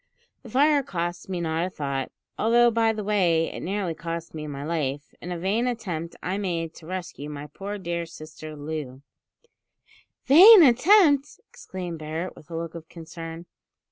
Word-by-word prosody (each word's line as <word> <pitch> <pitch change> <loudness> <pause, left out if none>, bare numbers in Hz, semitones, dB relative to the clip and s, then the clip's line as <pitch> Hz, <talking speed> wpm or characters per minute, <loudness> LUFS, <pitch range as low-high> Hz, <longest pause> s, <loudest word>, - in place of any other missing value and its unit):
The 245 - -12
fire 285 +4 +4
costs 175 -6 -4
me 185 -2 -2
not 160 0 -1
a - - -6
thought, 140 -5 -4 0.2
although, 240 +2 +4
by 225 0 +2
the 215 -1 -4
way, 180 -6 +1
it - - -7
nearly 190 -2 -2
cost 165 +1 -6
me 155 -1 -6
my 140 -1 -6
life, 145 -3 -3
in 175 - -6
a 175 - -3
vain 205 +8 0
attempt 180 -9 -4
I 190 +2 -2
made 165 -4 -2
to 160 - -13
rescue 175 -5 -6
my 145 0 -7
poor 195 +7 -6
dear 170 -3 -4
sister 155 -1 -10
Loo 145 -3 -6 0.6
" - - -33
"Vain 365 - +10
attempt!" 290 - +4
exclaimed 180 -3 -7
Barret, 160 +4 -5
with 150 - -16
a 165 - -6
look 165 0 -5
of 165 -2 -10
concern. 165 0 -9
170 Hz, 170 wpm, -25 LUFS, 160-210 Hz, 0.6 s, Vain